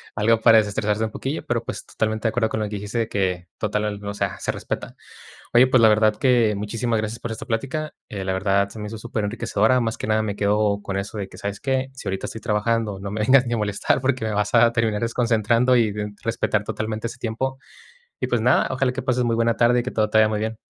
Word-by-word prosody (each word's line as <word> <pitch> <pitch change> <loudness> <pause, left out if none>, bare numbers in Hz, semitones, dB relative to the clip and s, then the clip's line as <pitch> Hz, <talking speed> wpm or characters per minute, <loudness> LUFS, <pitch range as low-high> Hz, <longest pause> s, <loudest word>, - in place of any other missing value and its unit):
algo 115 +2 +3
para 115 -1 +7
destresarse 105 +1 -1
un 110 - -2
poquillo. 140 +4 -4
Pero, 120 -1 -1
pues, - - -6
totalmente 110 0 -2
de - - +3
acuerdo 110 0 0
con 110 - -2
lo 105 - -2
que 105 - -5
dijiste 105 +3 -4
de 115 - -1
que 90 -4 -1
total 105 0 -1
el 105 -1 -4
o 100 - -3
sea, 100 -2 -2
se - - -1
respeta. - - -5 0.6
Oye, 125 +2 +7
pues 130 -1 +4
la 110 - +7
verdad 110 0 +3
que 120 -3 +3
muchísimas 110 +3 -1
gracias 110 +2 -4
por 120 - -5
esta 110 - -6
plática. 145 +7 -3 0.2
Eh, 100 -2 -5
la 95 - 0
verdad 100 +1 +1
se 110 - -10
me 105 - -5
hizo 110 - -6
superenriquecedora. 110 +1 0
Más 115 -2 -2
que - - -5
nada 110 0 +2
me 105 -2 -3
quedo 105 0 +1
con 95 - -3
eso 100 +2 -5
de 100 - -4
que, - - -13
¿sabes 100 0 -4
qué? 130 +1 -1
Si 130 - -9
ahorita 95 0 -2
estoy 110 - -7
trabajando, 105 -1 0
no 100 - -5
me 110 - -2
vengas 130 +4 +5
ni 120 - -1
a - - 0
molestar 105 +3 0
porque 130 -3 0
me 110 - -2
vas 105 0 -1
a 115 - +6
terminar 115 -3 0
desconcentrando 115 +1 +2
y 115 -3 +3
d 105 0 -5
respetar 110 -2 0
totalmente 110 +1 -3
ese 120 - -9
tiempo. 130 +3 -3 0.6
Y - - 0
pues 120 - 0
nada, 125 +3 +4
ojalá 130 0 +1
que 130 +1 -4
pases 125 -1 +1
muy 115 -1 +1
buena 115 0 +2
tarde 120 +1 +3
y - - -9
que 125 - -4
todo 110 -1 +1
te 110 - +2
vaya 110 0 +6
muy 105 -1 -1
bien. 110 +1 -3
110 Hz, 255 wpm, -23 LUFS, 105-120 Hz, 0.6 s, para